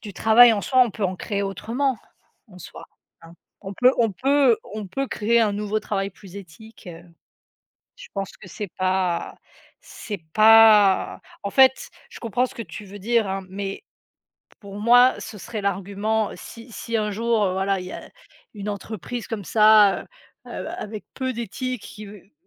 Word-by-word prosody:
du 205 -3 -8
travail 225 +4 +6
en 205 - -1
soi, 255 +3 +2
on 235 - -4
peut 205 +1 -4
en 185 0 -2
créer 200 0 -3
autrement 230 +6 -2 0.5
en 180 - -15
soi, 175 - -11 0.4
hein? 165 0 -14 0.3
On 195 -1 -7
peut 250 +6 +4
on 225 -4 +2
peut 270 +1 +3
on 210 -1 -8
peut 270 +9 -3
créer 235 +1 +1
un 215 -3 +2
nouveau 210 +1 -2
travail 195 -1 -3
plus 195 0 -14
éthique, 200 +4 -13
heu, 170 -1 -10 1.0
je - - -12
pense 195 -1 -4
que - - -14
c'est 200 +1 -7
pas 185 -2 -1 0.5
c'est 210 - -8
pas 215 -2 +6 0.2
en 200 - -2
fait, 265 +3 +4 0.2
je - - -12
comprends 240 +2 0
ce 265 - -11
que 235 - -5
tu 215 -2 -9
veux 200 +1 -11
dire, 230 0 +1
hein, 190 0 -4
mais 195 0 -6 0.8
pour 200 -1 -10
moi 245 +3 +6
ce 210 - -9
serait 215 +2 -6
l'argument 200 +3 -1
si 230 +1 -12
si 230 +1 -4
un 210 -1 -1
jour, 225 0 0
heu, 185 - 0
voilà, 195 +1 0
il 180 - -8
y - - -8
a - - -9 0.5
une 205 0 -6
entreprise 215 +3 -6
comme 210 -4 -5
ça, 215 -1 +5
heu, - - -18 0.7
avec 215 0 -7
peu 260 -1 -3
d'éthique 250 0 -5
qui 215 -1 -10
v 200 0 -15
210 Hz, 180 wpm, -23 LUFS, 195-230 Hz, 1.0 s, travail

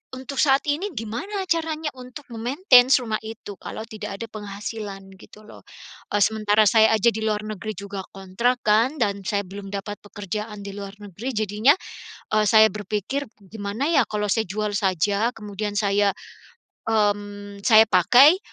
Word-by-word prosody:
untuk 265 +1 -3
saat 275 -2 +4
ini 315 +8 -1
gimana 245 - -4
caranya 320 -2 -1
untuk 255 +3 -10
memaintain 250 - +4
rumah 220 -3 -2
itu, 220 -2 -8
kalau 220 - -6
tidak 215 -3 -7
ada 230 - -4
penghasilan, 200 -1 -7
gitu 210 +1 -16
loh. - - -14 0.5
E 205 - +1
sementara 215 0 +3
saya 220 0 +5
aja 220 +2 +4
di 220 - -4
luar 215 -1 -1
negeri 215 0 -5
juga 200 -1 -6
kontrak 235 +7 -1
kan, 230 +8 +3
dan 200 -5 0
saya 200 +1 0
belum 195 +1 -9
dapat 200 +1 -5
pekerjaan 210 +1 -6
di 200 - -6
luar 200 0 -7
negeri, 210 +5 -7
jadinya, 215 +7 +3 0.6
e 215 0 +3
saya 220 0 +7
berpikir, 215 +7 -3 0.2
gimana 220 +6 -3
ya 275 -7 +4
kalau 210 -1 -2
saya 220 +2 0
jual 210 +1 -2
saja 200 +3 +1
kemudian 210 -1 -5
saya 200 -1 +2 0.8
mmm, 205 -2 -1
saya 220 -2 +8
pakai, 245 - +6
215 Hz, 155 wpm, -23 LUFS, 205-235 Hz, 0.8 s, saya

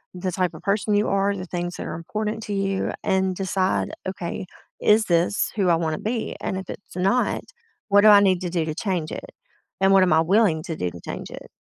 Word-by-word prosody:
the 185 0 -3
type 180 0 -1
of - - -12
person 205 +1 +1
you 210 +2 +2
are, 200 +1 +1
the 185 -1 -6
things 175 0 -4
that - - -6
are - - -5
important 210 +6 -4
to 205 - -4
you, 195 -1 -1
and 190 -2 +1
decide, 190 0 0 0.2
"Okay, 185 0 -5 0.3
is 215 +1 +4
this 175 +4 +1
who 195 -4 +2
I 170 - +5
wanna 160 -2 -1
be?" 225 +1 -3
And 190 - -2
if 190 0 -6
it's 200 - -9
not, 195 +7 +1 0.5
what 205 0 +6
do 215 - +6
I 205 -1 +9
need 185 -2 +3
to 180 - -2
do 170 -2 -1
to 155 - -3
change 180 -4 -2
it, - - -7 0.5
and 195 0 +4
what 195 - +6
am 180 - +3
I 160 - +5
willing 175 -3 +3
to 165 - -4
do 90 - -2
to 85 - -11
change - - -6
it? - - -10
190 Hz, 230 wpm, -23 LUFS, 175-200 Hz, 0.5 s, I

